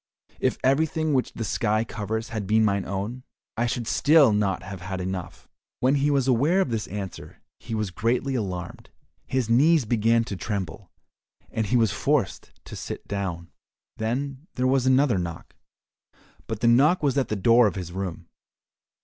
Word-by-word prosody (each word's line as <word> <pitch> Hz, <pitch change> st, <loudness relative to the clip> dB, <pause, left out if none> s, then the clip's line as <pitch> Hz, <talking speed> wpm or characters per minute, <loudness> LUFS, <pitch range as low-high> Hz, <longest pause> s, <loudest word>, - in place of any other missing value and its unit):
If -, -, 0 dB
everything 155 Hz, +3 st, +1 dB
which 130 Hz, -2 st, 0 dB
the 115 Hz, -, -4 dB
sky 110 Hz, +1 st, 0 dB
covers 110 Hz, +1 st, -4 dB
had 110 Hz, -5 st, -4 dB
been 110 Hz, +1 st, +4 dB
mine 100 Hz, -2 st, 0 dB
own, 100 Hz, +6 st, -4 dB, 0.3 s
I 120 Hz, +2 st, 0 dB
should 120 Hz, 0 st, -2 dB
still 145 Hz, -2 st, +5 dB
not 105 Hz, -2 st, 0 dB
have 95 Hz, -1 st, -8 dB
had 95 Hz, +1 st, -5 dB
enough." 90 Hz, -2 st, -5 dB, 0.3 s
When 130 Hz, +2 st, +3 dB
he 145 Hz, +1 st, +2 dB
was 140 Hz, -3 st, +2 dB
aware 140 Hz, +9 st, +3 dB
of 165 Hz, -10 st, +1 dB
this 115 Hz, -1 st, -2 dB
answer 100 Hz, -2 st, -7 dB, 0.2 s
he 115 Hz, -1 st, -5 dB
was 105 Hz, -3 st, -2 dB
greatly 120 Hz, +8 st, 0 dB
alarmed, 90 Hz, -7 st, -4 dB, 0.4 s
his 130 Hz, -3 st, 0 dB
knees 145 Hz, +5 st, +4 dB
began 115 Hz, +1 st, +2 dB
to 110 Hz, -4 st, -5 dB
tremble, 95 Hz, -1 st, -5 dB, 0.6 s
and 110 Hz, -2 st, -1 dB
he 125 Hz, -, +2 dB
was 115 Hz, -2 st, +3 dB
forced 140 Hz, -9 st, -1 dB
to -, -, -9 dB
sit -, -, -7 dB
down. 95 Hz, -4 st, -4 dB, 0.5 s
Then 135 Hz, +6 st, -3 dB
there 125 Hz, -, 0 dB
was 130 Hz, 0 st, +2 dB
another 130 Hz, -5 st, +4 dB
knock, 85 Hz, -2 st, -6 dB, 0.9 s
but 110 Hz, -2 st, -4 dB
the 115 Hz, -, +3 dB
knock 145 Hz, +9 st, +4 dB
was 140 Hz, -3 st, +2 dB
at 135 Hz, -2 st, +1 dB
the 110 Hz, -, -2 dB
door 115 Hz, +4 st, +5 dB
of 105 Hz, -, -3 dB
his 90 Hz, -3 st, -5 dB
room. 90 Hz, -2 st, -5 dB
115 Hz, 175 wpm, -25 LUFS, 100-130 Hz, 0.9 s, still